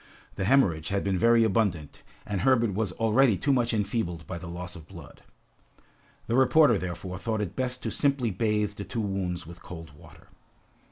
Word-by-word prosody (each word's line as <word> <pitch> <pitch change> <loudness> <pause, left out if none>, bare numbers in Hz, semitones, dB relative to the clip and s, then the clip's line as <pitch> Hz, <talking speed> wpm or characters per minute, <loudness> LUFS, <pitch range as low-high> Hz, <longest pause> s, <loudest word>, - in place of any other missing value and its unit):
The 95 - -3
hemorrhage 95 - +3
had 100 0 -1
been 95 -2 0
very 115 +2 +5
abundant, 95 -8 0 0.2
and 100 -3 -2
Herbert 115 -3 +3
was 100 -1 -1
already 115 0 +3
too 140 - +1
much 120 -2 +1
enfeebled 100 -7 -2
by 85 +3 -6
the 85 - -8
loss 90 +1 -7
of 80 -3 -12
blood. - - -13 1.0
The - - -3
reporter, 130 0 +5
therefore, 90 +1 -5
thought 110 +1 -2
it 100 -2 -4
best 125 0 -3
to - - -2
simply 140 -5 +1
bathe 105 +1 0
the 100 0 -7
two 100 +4 -5
wounds 95 -4 -3
with 85 +2 -11
cold 80 -3 -10
water. 85 +2 -17
100 Hz, 180 wpm, -27 LUFS, 90-115 Hz, 1.0 s, very